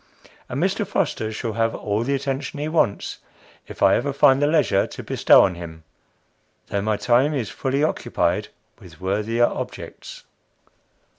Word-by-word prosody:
And 130 +1 -3
Mr. 190 +5 0
Foster 145 - -1
shall 110 +1 -4
have 115 0 0
all 105 +1 -2
the 140 +4 0
attention 140 +1 -3
he 150 - -2
wants 155 -10 0 0.5
if - - -5
I - - +6
ever 140 +4 -1
find 135 0 +4
the 145 - +3
leisure 150 -11 +2
to - - -9
bestow - - +5
on 95 - +1
him, 80 -2 -9 0.9
though 100 - -1
my 105 +1 0
time 130 +7 +2
is 120 -7 -3
fully 135 +2 -1
occupied 155 - 0 0.3
with - - -15
worthier 105 +5 +1
objects. - - -7
120 Hz, 155 wpm, -22 LUFS, 105-145 Hz, 0.9 s, I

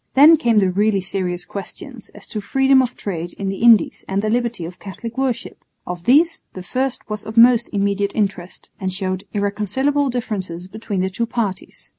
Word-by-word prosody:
Then 300 +5 +9
came 235 -7 +1
the 190 -3 +3
really 205 +2 +2
serious 180 -2 -1
questions 215 - -8
as - - -6
to 210 - -4
freedom 270 +5 +4
of 250 -1 -2
trade 175 -3 -4
in 195 -1 -4
the 195 - -4
Indies 230 -5 +5
and 195 +1 -1
the 215 - 0
liberty 235 -6 -1
of 175 +2 -9
Catholic 225 +4 -8
worship. 260 -3 -3 0.2
Of 175 -1 -6
these 325 +6 +4
the 185 - -8
first 255 +7 -2
was 210 0 -4
of 220 +1 -8
most 235 0 +6
immediate 200 0 0
interest, 195 -4 -3
and 190 -2 -2
showed 185 0 -3
irreconcilable 215 +8 0
differences 195 -8 -4
between 205 -1 -4
the 190 +1 -1
two 230 +5 -2
parties. 210 -5 -4
210 Hz, 185 wpm, -20 LUFS, 190-240 Hz, 0.2 s, Then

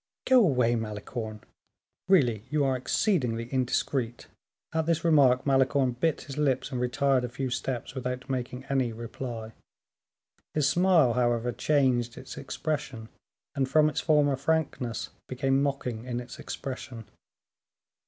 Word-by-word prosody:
"Go 260 -1 +6
away, 125 - +3
Malicorne; 110 0 -5 0.7
really 125 - +3
you 150 -1 +1
are 135 -1 +2
exceedingly 125 - 0
indiscreet." 125 -1 -1 0.5
At 160 0 0
this 165 -2 +1
remark 135 -6 +5
Malicorne 135 -1 +3
bit 150 +6 0
his 140 +1 -7
lips 135 -2 +1
and 125 -2 -2
retired 130 +1 +2
a 125 - -2
few 130 +1 -4
steps, 125 0 -3
without 125 0 -4
making 125 -1 -3
any 135 -3 0
reply. 115 0 -6 1.0
His 150 -3 +3
smile, 165 -5 +4
however, 120 0 +1
changed 125 -5 +1
its - - -9
expression, 135 -7 -4 0.4
and 135 -3 0
from 155 +2 +5
its 150 - -2
former 145 -3 +3
frankness, 135 -7 -1 0.2
became 135 +1 +1
mocking 125 -5 -2
in 120 -1 -3
its 125 0 -9
expression. 125 -4 -6
130 Hz, 135 wpm, -28 LUFS, 120-140 Hz, 1.0 s, Go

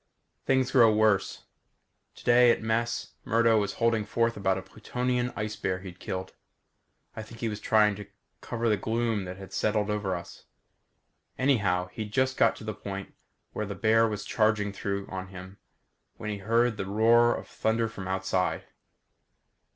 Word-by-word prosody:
Things 130 -1 +2
grow 115 -4 +6
worse. 105 -2 +2 0.7
Today, 120 0 +5
at 115 - +2
mess, 115 +1 -1
Murdo 115 -1 +3
was 100 -2 -1
holding 115 -2 +1
forth 115 +2 0
about 95 -2 0
a 95 - -6
Plutonian 125 +5 -2
ice 105 -1 -3
bear 95 -2 -2
he'd 95 -2 -10
killed. 95 0 -5 0.8
I - - -5
think 110 +1 -12
he 115 - -1
was 105 -1 -5
trying 105 -1 +3
to 105 - -9 0.3
cover 115 0 -2
the 105 -2 +3
gloom 115 -1 -1
that 90 +1 -7
has 95 0 -11
settled 105 -1 0
over 105 -3 -1
us. 85 - -10 0.9
Anyhow, 100 -10 +1
he'd 105 +3 -6
just 130 +3 +1
got - - +3
to - - -11
the 110 0 -4
point 100 -1 -7 0.4
where 105 - -3
the 100 - -5
bear 115 +3 +3
was 105 -2 -4
charging 105 -2 +1
down 100 0 -3
on 95 0 -6
him 95 +1 -11 0.6
when 105 - -4
we 100 - -4
heard 115 +3 +1
the 95 - -4
roar 115 +3 +4
of - - -8
thunder 115 +1 0
from 95 -4 -8
outside. 95 -1 -1
105 Hz, 165 wpm, -28 LUFS, 100-115 Hz, 0.9 s, grow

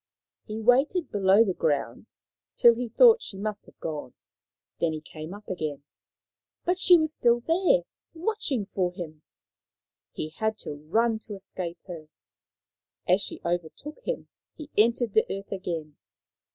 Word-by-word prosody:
He 215 0 -5
waited 270 - +2
below 200 +1 +5
the 190 - 0
ground 145 - -1 0.5
till 235 - +7
he 240 0 -4
thought 465 - +6
she 195 - -7
must 210 +1 -3
have - - -19
gone, 150 -5 -5 0.6
then 165 -2 +1
he 155 - -4
came 155 +1 -9
up 205 +2 -10
again. 155 -6 -4 0.8
But 360 +1 +1
she 360 -2 +8
was 315 -1 0
still 240 -3 +3
there, 370 - +3 0.3
watching 330 - -1
for 180 -2 +1
him. 160 -4 -8 0.9
He 155 - -5
had 220 +7 -2
to - - -4
run 220 +11 0
to 210 - -6
escape 185 -3 -6
her. 165 -4 -8 1.0
As 185 +3 +4
she - - -2
overtook 175 - -4
him - - -3 0.3
he 305 -3 -10
entered 230 0 +3
the 220 - +3
earth 195 0 -5
again. 165 -6 -4
205 Hz, 150 wpm, -27 LUFS, 170-245 Hz, 1.0 s, she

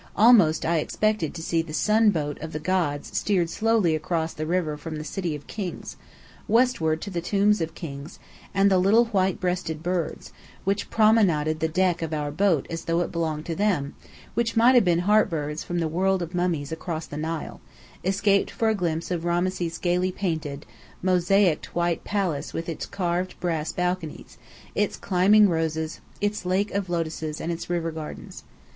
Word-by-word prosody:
Almost 205 -8 +5
I 165 0 +2
expected 215 0 -1
to 160 - -6
see 165 0 +1
the 160 -2 -6
sun 215 +3 +4
boat 150 -6 -2
of 160 +1 -6
the 155 - -3
gods 155 -4 -1
steered 180 -5 +1
slowly 220 -6 +2
across 160 +1 -1
the 155 +1 -4
river 170 -3 0
from 155 +2 -7
the 155 - -5
city 170 -1 -3
of 145 - -10
Kings, 190 -5 -6 0.5
westward 210 -9 +2
to 200 - -6
the 175 -2 -2
tombs 205 +2 +2
of 165 0 -3
Kings; 145 -1 -8 0.3
and 195 +1 +3
the 190 - +4
little 215 +6 +5
white 190 -5 0
breasted 180 -4 -2
birds, 175 -2 -3 0.3
which 195 +1 -1
promenaded 185 -9 +3
the 160 - +1
deck 175 +1 +1
of 160 -1 -2
our 145 -1 -2
boat 165 -2 +2
as 165 0 -6
though 170 +1 +1
it 175 - -2
belonged 160 -2 -2
to 170 - -3
them, 180 -9 0 0.6
might 235 +3 +6
have 245 - +6
been 175 -3 +3
Heart 210 +1 +4
birds 150 -1 -3
from 175 - -4
the 165 -1 0
world 185 +3 +1
of 170 +1 -7
mummies 175 -5 -1
across 160 0 -4
the - - -9
Nile, 160 +1 -4 0.4
escaped 200 +2 +2
for 225 - 0
a - - +3
glimpse 170 -4 -2
of 170 -2 -1
Rameses' 175 0 -1
gayly 180 +1 +1
painted, 160 -6 -3 0.4
mosaiced 185 -1 +2
white 170 -1 0
palace 190 -8 -2
with 165 - -3
its 165 - -4
carved 180 -1 -2
brass 165 -3 -1
balconies, 180 -3 -3 0.3
its 210 -1 0
climbing 205 +3 +4
roses, 160 -2 -2 0.2
its 205 0 -1
lake 185 +3 0
of 200 -2 -2
lotuses 160 -2 -3
and 165 - -3
its 170 0 -5
river 170 -1 -1
gardens. 155 -1 -8
175 Hz, 180 wpm, -25 LUFS, 160-195 Hz, 0.6 s, might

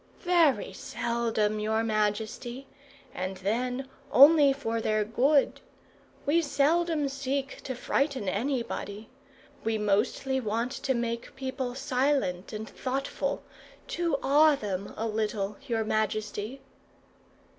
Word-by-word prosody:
"Very 330 - +3
seldom, 235 -5 -1
your 220 +1 0
majesty; 220 +4 -1 0.5
and 185 +1 -4
then 250 +7 -1 0.2
only 290 +1 +8
for 230 -5 -2
their 215 -1 +1
good. 270 +6 +2 0.6
We 320 +4 +3
seldom 310 +1 +2
seek 275 0 -3
to 260 - -3
frighten 270 -3 0
anybody. 220 -1 -2 0.5
We 225 0 0
mostly 215 +6 +1
want 230 +1 -1
to 265 -1 -1
make 235 +1 -3
people 260 -2 -4
silent 255 -9 0
and 215 0 -5
thoughtful; 270 +4 -3 0.5
to 335 -4 0
awe 295 +3 +6
them 200 -6 -4
a 225 - -2
little, 210 -2 -2
your 225 -2 0
majesty." 215 +3 -2
240 Hz, 110 wpm, -28 LUFS, 215-275 Hz, 0.6 s, only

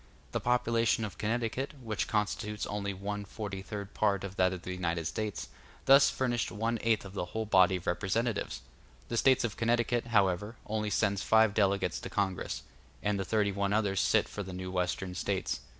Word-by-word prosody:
The - - -1
population 115 -2 +2
of 100 -5 -8
Connecticut, 120 +6 -1
which 110 -4 -2
constitutes 105 0 -1
only 100 -1 -3
one 100 +2 -4
forty 100 -1 -6
third 100 0 -6
part 100 -2 +1
of 100 -1 -6
that 95 -1 +3
of 90 -2 -6
the 90 - -5
United 85 -2 -2
States, 105 +4 -3 0.4
thus 135 +1 +7
furnished 120 -3 -1
one 115 +2 -1
eighth 115 -3 +1
of 95 - -9
the 95 - -2
whole 110 +5 -3
body 95 -2 +5
of 90 - -5
representatives. 100 +5 -1 0.5
The 120 - -1
States 130 +2 +4
of 115 -3 -2
Connecticut, 120 0 +1
however, 105 -1 +2
only 105 0 -1
sends 100 -1 +1
five 110 0 +4
delegates 100 -2 +1
to - - -7
Congress; 95 -2 -2 0.4
and 105 -1 +1
the 95 - -2
thirty 105 0 +1
one 100 0 0
others 100 -3 +2
sit - - +3
for 105 - -6
the 95 -2 -6
new 90 0 -5
Western 90 0 -1
States. 95 +1 -2
105 Hz, 185 wpm, -31 LUFS, 95-115 Hz, 0.5 s, thus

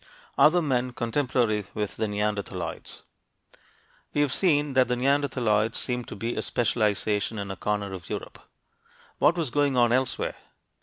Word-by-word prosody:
OTHER 175 +3 +5
MEN 130 -3 0
CONTEMPORARY 120 -4 0
WITH 105 -1 -3
THE 110 - 0
NEANDERTHALOIDS 100 -5 -4 1.1
We 145 - +3
have 145 -2 +1
seen 145 -5 +2
that 130 -1 +4
the 125 - 0
neanderthaloids 125 -5 +1
seem 125 -1 -2
to - - -8
be 115 +4 -3
a - - -1
specialization 105 -2 0
in 100 -1 -4
a - - -5
corner 100 0 -2
of 90 -3 -8
Europe. - - -6 0.8
What 170 - +4
was 160 -7 -1
going 145 -2 +2
on 120 -1 +4
elsewhere? 130 0 0
120 Hz, 150 wpm, -26 LUFS, 105-135 Hz, 1.1 s, OTHER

